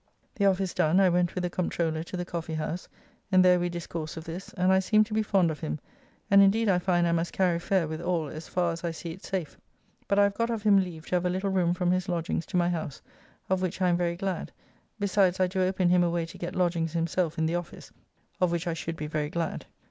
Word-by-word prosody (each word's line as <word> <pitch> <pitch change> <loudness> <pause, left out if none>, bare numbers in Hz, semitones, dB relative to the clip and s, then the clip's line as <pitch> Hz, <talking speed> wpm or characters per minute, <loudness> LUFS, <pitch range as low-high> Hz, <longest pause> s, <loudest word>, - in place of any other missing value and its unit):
The 200 -2 +2
office 190 -1 +1
done, 160 +5 +3
I 190 -1 +5
went 175 0 +1
with 180 - -2
the 180 - 0
Comptroller 165 -3 -1
to 180 - -6
the 175 - -3
Coffee 170 -2 -4
house, 155 +3 -4 0.4
and 185 -1 +6
there 180 -1 +6
we 175 0 0
discoursed 170 -2 -5
of 160 - -6
this, 170 +3 -7
and 185 0 +2
I 190 - +5
seem 215 +3 +4
to 215 0 -7
be 220 - +2
fond 195 -6 +2
of 150 - -6
him, 75 - -3 0.5
and 200 0 +8
indeed 215 +3 +4
I 180 -2 +3
find 175 -1 +2
I - - +1
must 170 0 0
carry 180 -3 +2
fair 180 -1 +1
with 155 +1 -5
all 170 -3 -1
as 155 +3 -8
far 175 -2 0
as 165 +1 -6
I 170 - 0
see 165 0 -6
it 185 +4 -11
safe, 180 -6 -4 0.5
but 200 - +1
I 205 - +6
have 200 0 +2
got 230 +2 -1
of 225 -3 -2
him 205 -2 +6
leave 170 -4 -4
to 180 - +2
have 180 - -2
a - - 0
little 190 +2 -1
room 180 -2 +2
from 180 -1 +1
his 185 +1 0
lodgings 170 -1 -2
to 185 - -1
my 175 0 +2
house, 155 -5 -4 0.5
of 190 0 +1
which 185 -1 -2
I 185 -1 +3
am 175 - +3
very 170 -1 0
glad, 190 +1 -3 0.5
besides 195 -2 +2
I 185 - +4
do 185 +1 -1
open 185 -1 +2
him 180 0 +4
a 175 - +2
way 170 -1 -1
to 165 - -11
get 175 +2 -5
lodgings 170 -3 0
himself 170 0 -1
in 160 - +1
the 160 - 0
office, 175 0 -5 0.5
of 180 -2 +2
which 170 +1 -1
I 170 - -1
should 165 0 -4
be 150 - -5
very 150 -1 -2
glad. 170 +1 -3
175 Hz, 265 wpm, -28 LUFS, 165-185 Hz, 0.5 s, and